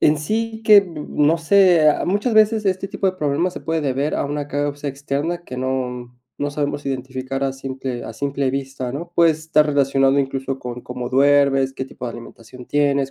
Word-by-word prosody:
en 150 - +4
sí 220 +7 -2
que, 215 -1 +8
n 170 -7 -3
no 150 +2 +2
sé, 175 -2 +5
ah, - - -1
muchas 205 +5 0
veces 215 0 +4
este 190 0 0
tipo 195 - -3
de 185 - -16
problemas 155 +3 0
se - - -8
puede 160 0 -1
deber 140 +1 -1
a - - -1
una 145 0 -3
causa 145 0 -3
externa 145 +5 -3
que 130 - -8
no 125 -1 -3 0.3
no 145 0 -1
sabemos 145 0 -3
identificar 130 0 -4
a 135 -1 0
simple 130 -2 -5
a - - -7
simple 140 +2 -2
vista, 135 -2 -4
¿no?, 170 +5 -6
puede 170 -2 +5
estar 155 -1 +1
relacionado 135 -1 +2
incluso 135 0 -3
con 125 0 -6
cómo 125 0 -5
duermes, 135 0 +3
qué 135 - -5
tipo 130 -1 -10
de 120 - -4
alimentación 120 +1 -12
tienes, 140 -1 +1
140 Hz, 195 wpm, -21 LUFS, 135-160 Hz, 0.3 s, que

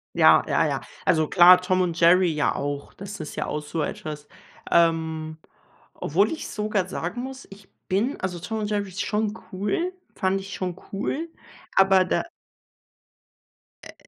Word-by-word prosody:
Ja, - - +6
ja, - - +2
ja. - - -2 0.2
Also 160 -4 +3
klar, 180 0 +7
Tom 185 0 +1
und 170 -2 -1
Jerry 175 +1 +5
ja 150 -1 0
auch. 145 0 -4
Das 200 0 -8
ist 155 - -7
ja - - -2
auch 150 - -3
so 155 +2 -4
etwas, 150 0 -6 0.4
ähm, 160 -2 +1 0.6
obwohl 195 +8 +1
ich 320 - -5
sogar 210 -3 -1
sagen 185 +7 -4
muss, 265 +1 -8
ich 195 0 -14 0.2
bin 215 +10 0
also 180 -2 -3
Tom 220 +6 -4
und 210 -1 -2
Jerry 205 -2 -1
ist 185 +1 -4
schon 210 0 -1 0.2
cool 210 - -1 0.2
fand 190 0 0
ich 195 - -10
schon 180 -2 -3 0.2
cool, 275 +11 -3 0.5
aber 195 -1 +6
da 180 - 0 1.6
äh, - - -11
185 Hz, 160 wpm, -24 LUFS, 165-205 Hz, 1.6 s, klar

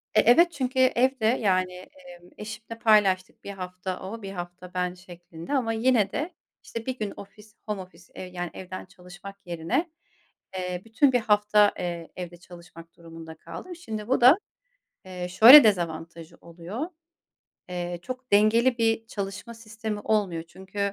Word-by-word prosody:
E, - - +6
evet, 340 +9 +5
çünkü 260 -4 -2
evde, 255 -1 +2
yani, 185 -6 +1
eee, 185 - -14 0.2
eşimle 220 +2 -8
paylaştık, 200 -5 +2
bir 200 - -6
hafta 185 -1 -6
o, 220 +5 -7
bir 195 -1 -7
hafta 180 0 -8
ben 180 -1 -1
şeklinde 175 - -10
ama 240 -5 +1
yine 225 -3 +2
de, 310 +5 -3 0.3
işte, 230 -1 -7
bir 260 -1 -3
gün 210 -2 -3
ofis 210 +2 -14
home 210 -3 -3
office, 185 0 -15
eee, - - -7
yani, 175 -1 -5
evden 185 0 -8
çalışmak 180 +2 -12
yerine, 175 - -2 0.7
eee, 180 -1 -4
bütün 245 +5 +2
bir 245 - +3
hafta, 210 -1 +3
eee, 170 -2 -4
evde 175 -1 -7
çalışmak 170 -1 -15
durumunda 165 -1 -11
kaldım. 170 - -9
Şimdi 220 -10 -7
bu 260 - +2
da, 255 +8 +7 0.7
eee, 180 -1 -6
şöyle 235 +10 +10
dezavantajı 170 -5 -2
oluyor. 180 - -6 0.8
Eee, 175 -1 -4
çok 255 +4 -8
dengeli 230 +4 +4
bir 225 -1 0
çalışma 200 +2 -6
sistemi 220 -2 -6
olmuyor. 200 -7 -1
Çünkü, 190 +3 -10
200 Hz, 150 wpm, -26 LUFS, 180-230 Hz, 0.8 s, şöyle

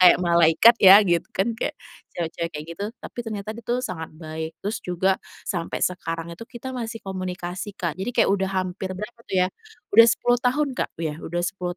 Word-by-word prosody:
kayak 180 -1 +8
malaikat 170 +6 +6
ya 195 0 +10
gitu, 170 -2 +1
kan 225 +5 0
kayak - - -2 0.4
cewek-cewek 170 0 -3
kayak 150 +1 -7
gitu, 200 +4 -5
tapi - - -12
ternyata 215 -3 -5
dia 235 - -9
tuh 250 +1 0
sangat 160 -5 -5
baik. 160 0 -6
Terus 210 - -2
juga 180 +2 +1 0.3
sampai 170 -3 -2
sekarang 165 -2 -3
itu 230 +8 -10
kita 255 +1 -7
masih 230 -3 -5
komunikasi 185 +1 -5
Kak, 170 0 -3
jadi 215 +6 -2
kayak - - +4
udah 190 -1 +1
hampir 185 0 -3
berapa 210 +5 -7
tuh 190 - -1
ya, - - -1 0.4
udah 230 0 +9
10 245 +1 +2
tahun 280 +4 +1
Kak, - - -4
ya, 160 -1 -4
udah 175 +1 -3
10 180 -1 -3
185 Hz, 195 wpm, -24 LUFS, 170-225 Hz, 0.4 s, ya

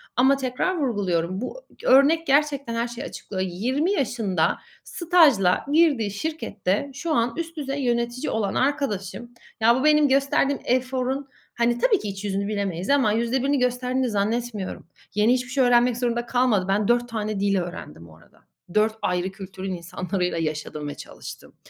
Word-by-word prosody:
Ama 265 +2 +4
tekrar 270 +8 -1
vurguluyorum. 190 - -1
Bu - - -6
g - - -7
örnek 310 +5 +5
gerçekten 280 -3 +1
her 235 +1 0
şeyi 240 0 -7
açıklıyor. 190 -2 -5
20 260 - 0
yaşında 225 - 0 0.3
stajla 305 - +3
girdiği 290 -10 +3
şirkette 215 - -2
şu 315 +4 -3
an 235 -1 +1
üst 335 0 -5
düzey 280 -1 -3
yönetici 240 +2 -1
olan 210 -3 -1
arkadaşım 240 -5 -1 0.3
ya 230 +2 +5
bu 260 - -1
benim 300 -1 +5
gösterdiğim 275 +1 +2
eforun 255 +2 -1 0.3
hani 235 0 +1
tabii 425 - +3
ki - - -6
iç 195 +1 -6
yüzünü 200 0 -1
bilemeyiz 195 -4 -3
ama 275 -6 +4
%1'ini 260 +4 +1
gösterdiğini 250 0 0
zannetmiyorum. 215 -2 -2 0.3
Yeni 210 +3 +4
hiçbir 255 0 -2
şey 265 -1 +2
öğrenmek 245 0 +4
zorunda 240 -1 -1
kalmadı. 240 -6 +2
Ben 200 +1 +1
4 240 0 +2
tane 215 -2 -3
dil 200 0 +2
öğrendim 85 - -7
bu 80 -2 -16
arada. 80 - -23 0.3
4 215 +1 +2
ayrı 180 +1 -1
kültürün 190 -1 -6
insanlarıyla 180 +1 -3
yaşadım 155 -2 -3
ve 145 - -5
çalıştım - - -11
240 Hz, 160 wpm, -24 LUFS, 200-275 Hz, 0.3 s, örnek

